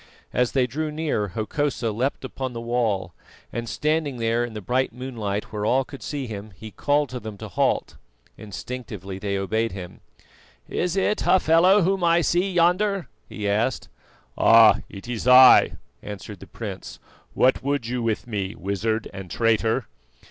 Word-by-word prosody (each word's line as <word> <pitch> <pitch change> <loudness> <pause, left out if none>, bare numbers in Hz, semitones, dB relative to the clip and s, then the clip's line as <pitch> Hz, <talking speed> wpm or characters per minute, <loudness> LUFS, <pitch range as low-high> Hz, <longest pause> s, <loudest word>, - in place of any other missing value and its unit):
As 125 0 +1
they 130 -2 +3
drew 155 +6 -3
near, 150 -9 -1
Hokosa 115 +4 -2
leapt 130 +5 -2
upon 130 -1 -5
the 115 - -5
wall, 115 -7 -1 0.4
and 120 -1 -4
standing 150 +1 -1
there 115 +1 +1
in 120 -2 -6
the - - -4
bright 125 +6 0
moonlight 110 -5 -5
where 105 -1 -3
all 130 +5 +2
could 140 - -11
see 145 -3 -4
him, 105 -2 -8
he 110 +3 -10
called 145 +3 +1
to 125 - -5
them 110 -3 -8
to - - -7
halt. - - 0 0.4
Instinctively 105 -3 -7
they 100 0 -2
obeyed 110 +2 -1
him. 90 -2 -8 0.7
"Is 180 0 -1
it 205 +2 +1
Hafela 185 +3 +4
whom 190 +1 +1
I 170 0 +4
see 180 +4 +1
yonder?" 185 +2 +2 0.2
he 105 -1 -4
asked. 110 - 0 0.5
"Ah! 115 -1 +7
it 100 +2 -10
is 120 0 -4
I," 125 0 +8 0.3
answered 105 -1 -8
the - - -12
prince. - - -7 0.4
"What 130 -1 +3
would 140 -2 -1
you 125 +1 -2
with 115 -2 -1
me, 100 -4 -4
wizard 105 +4 -2
and 95 -2 -8
traitor?" 115 +2 +1
120 Hz, 165 wpm, -24 LUFS, 105-145 Hz, 0.7 s, I